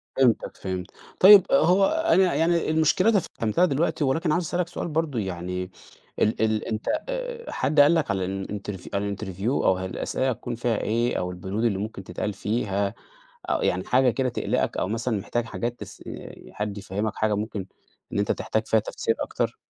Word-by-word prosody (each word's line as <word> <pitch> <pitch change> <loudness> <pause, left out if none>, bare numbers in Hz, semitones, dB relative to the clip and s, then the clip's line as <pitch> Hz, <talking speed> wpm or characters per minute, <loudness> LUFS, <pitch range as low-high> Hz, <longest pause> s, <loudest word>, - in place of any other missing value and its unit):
فهمتك 130 -4 +2
فهمت، 95 -1 -5 0.3
طيب 195 0 +9
هو 195 -7 +5
أنا 320 - +3
يعني 170 0 +2
المشكلة 160 +7 +3
تفهّمتها 175 - +1
دلوقتي 160 0 0
ولكن 155 +4 +1
عاوز 175 +2 +1
أسألك 175 +2 -1
سؤال 175 - -5
برضه 155 -5 -1
يعني 90 -1 -4 0.5
ال 110 - +1
ال 110 -1 +1
أنت 110 -1 -3 0.2
آآ، - - -4
حد 155 - 0
قال 145 +4 +7
لك 160 -7 +1
على 95 -2 -1
الانترف 95 0 -5
على 100 0 -1
الinterview 95 0 -5
أو 95 -8 +2
الأسئلة 95 +7 -2
هتكون 120 0 -4
فيها 115 -2 0
إيه؟ 120 +3 0
أو 90 - -2
البنود 95 +5 -4
اللي 105 -5 +2
ممكن 100 -1 -5
تتقال 100 +3 -4
فيها؟ 100 -1 -1 0.6
آآ، - - +2
يعني - - 0
حاجة 130 0 +3
كده 130 +2 0
تقلِقك - - -1
أو - - -1
مثلًا 115 0 -1
محتاج 120 +4 -2
حاجات 120 +1 -4
تس - - -10
آآ، - - -8 0.2
حد 105 -1 -4
يفهّمك 100 +2 -3
حاجة 110 -1 +1
ممكن 105 -2 -4 0.5
إن - - -1
أنت 100 - +2
تحتاج 110 0 -2
فيها 110 - +3
تفسير 115 +1 -2
أكتر؟ - - -2
115 Hz, 175 wpm, -25 LUFS, 100-155 Hz, 0.6 s, طيب